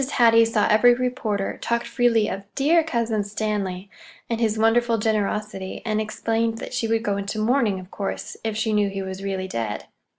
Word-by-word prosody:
Hattie 230 -2 +6
saw 225 -2 +1
every 240 +3 +5
reporter, 240 -5 -2
talked 235 0 -1
freely 230 -4 +2
of 195 -1 -4
"dear 320 +4 +4
Cousin 230 -8 -1
Stanley" 205 -2 -3 0.4
and 230 0 -1
his 220 -1 +1
wonderful 230 +1 +3
generosity, 210 -2 -2
and 215 -1 0
explained 225 +1 -1
that - - -7
she 245 -2 -1
would 225 0 +1
go 205 -3 0
into 200 +2 -4
mourning, 215 -3 +1
of 185 0 -12
course, 200 - -4
if 220 -1 -2
she 220 0 0
knew 205 -1 +2
he 195 0 -4
was 190 0 -6
really 190 -1 -3
dead. 115 - -4
220 Hz, 185 wpm, -23 LUFS, 200-230 Hz, 0.4 s, Hattie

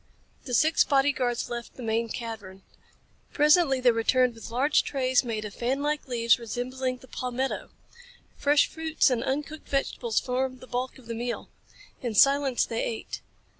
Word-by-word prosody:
The 245 - -1
six 315 +7 +4
body 275 0 +3
guards 245 -3 -1
left 235 0 -6
the 255 - -9
main 225 +1 0
cavern. 210 -5 -7 0.7
Presently 300 -2 +4
they 250 -1 +5
returned 245 +2 +2
with 225 0 -10
large 265 +6 +3
trays 260 -2 +1
made 220 -3 -3
of 205 - -7
fanlike 280 +5 -1
leaves 235 -1 +3
resembling 255 +3 -3
the 260 - -17
palmetto. 255 +2 -3 0.7
Fresh 290 0 +4
fruits 320 -3 +1
and 240 -2 0
uncooked 295 +3 -3
vegetables 250 -4 0
formed 255 0 -2
the - - -11
bulk 250 +1 -3
of 260 - -16
the 230 - -5
meal. 235 +1 -4 0.5
In 235 -4 -3
silence 275 +1 +4
they 230 -1 -2
ate. 225 - -5
255 Hz, 160 wpm, -27 LUFS, 235-275 Hz, 0.7 s, they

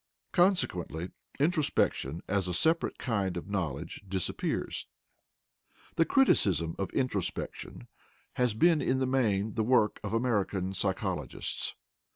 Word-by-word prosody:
Consequently 95 - +1 0.3
introspection 145 - +1
as 95 -1 0
a 90 - -1
separate 160 - +2
kind 100 -7 -1
of 85 - -6
knowledge 85 -5 -3
disappears. 95 -1 -2 1.1
The 165 - +4
criticism 95 - +3
of 95 -2 -1
introspection 105 - -3 0.5
has 125 -4 +1
been 165 +5 +4
in 130 - +1
the 130 - +1
main 110 -6 +1
the 110 - 0
work 115 -3 +3
of 100 - -3
American 105 -5 0
psychologists. 95 -3 -2
100 Hz, 115 wpm, -30 LUFS, 90-130 Hz, 1.1 s, The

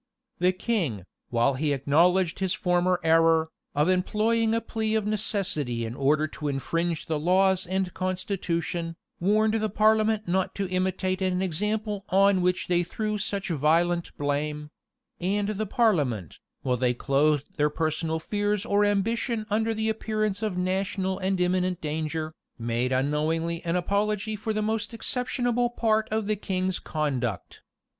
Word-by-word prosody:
The 180 +1 +4
king, 180 - -2 0.2
while 120 +3 +2
he 145 +2 0
acknowledged 170 +7 +2
his 190 -1 0
former 180 0 +1
error, 165 0 +4 0.3
of 150 +2 +3
employing 220 +5 +2
a - - +2
plea 220 -1 -2
of 215 -2 0
necessity 190 - 0
in 115 - -5
order 145 +4 +2
to 150 0 -6
infringe 165 +4 -1
the 160 -3 -1
laws 185 +3 +3
and 190 0 -1
constitution, 180 -3 -2 0.2
warned 215 +4 +2
the 215 -1 0
parliament 215 0 +2
not 185 +1 0
to 200 -1 -2
imitate 185 +1 -1
an 185 0 +1
example 210 +3 -1
on 195 0 +4
which 180 +1 +1
they 175 -1 +2
threw 210 +4 -3
such 200 0 -2
violent 170 +3 +1
blame; 150 +1 -2 0.5
and 200 +3 0
the 215 0 -2
parliament, 145 - +1 0.2
while 125 -1 +1
they 125 0 +1
clothed 145 +2 +1
their 150 0 +3
personal 160 +1 -1
fears 205 +3 -1
or 205 -2 +2
ambition 220 +3 0
under 220 +2 +1
the 220 0 -1
appearance 215 -2 -1
of 210 -4 -2
national 190 +1 -1
and 190 0 0
imminent 180 0 +1
danger, 155 +1 -3 0.2
made 120 +1 -1
unknowingly 155 +5 0
an 170 0 -1
apology 210 +3 0
for 215 +2 -3
the 215 0 -1
most 220 +1 -2
exceptionable 245 0 0
part 220 -2 +1
of 220 0 -1
the 215 +1 0
king's 185 -2 -2
conduct. 130 - -3
185 Hz, 150 wpm, -26 LUFS, 155-210 Hz, 0.5 s, The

